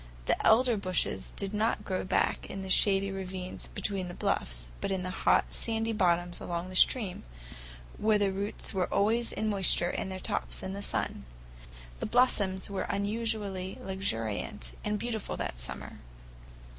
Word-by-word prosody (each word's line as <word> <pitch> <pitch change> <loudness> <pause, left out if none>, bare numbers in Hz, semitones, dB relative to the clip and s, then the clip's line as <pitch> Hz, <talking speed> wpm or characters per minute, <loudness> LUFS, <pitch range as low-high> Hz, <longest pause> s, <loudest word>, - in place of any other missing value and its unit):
The - - +1
elder 235 +1 +5
bushes 185 -3 -1
did 195 0 -4
not 215 0 0
grow 185 -1 -1
back 185 - +1
in 195 0 -5
the 190 - -4
shady 195 0 +4
ravines 185 -1 -5
between 195 -3 -2
the 175 - -7
bluffs, - - -1 0.2
but - - -1
in 190 -1 -1
the 185 - -3
hot, - - +2
sandy 225 0 0
bottoms 175 -3 +1
along 175 +1 -3
the 185 - -8
stream, 205 -1 +4 0.8
where 215 0 +4
their 200 -1 +2
roots 200 +3 0
were 185 -2 0
always 225 +3 +2
in 220 - -2
moisture 190 -4 +3
and 190 - -3
their 185 - -5
tops - - -2
in 190 0 -4
the 200 - -5
sun. 65 - -2 0.7
The - - -2
blossoms 210 -5 +3
were 200 -1 -3
unusually 200 -2 -2
luxuriant 115 - -3
and 210 0 0
beautiful 225 -1 -3
that - - -4
summer. 60 - -3
195 Hz, 160 wpm, -30 LUFS, 185-210 Hz, 0.8 s, elder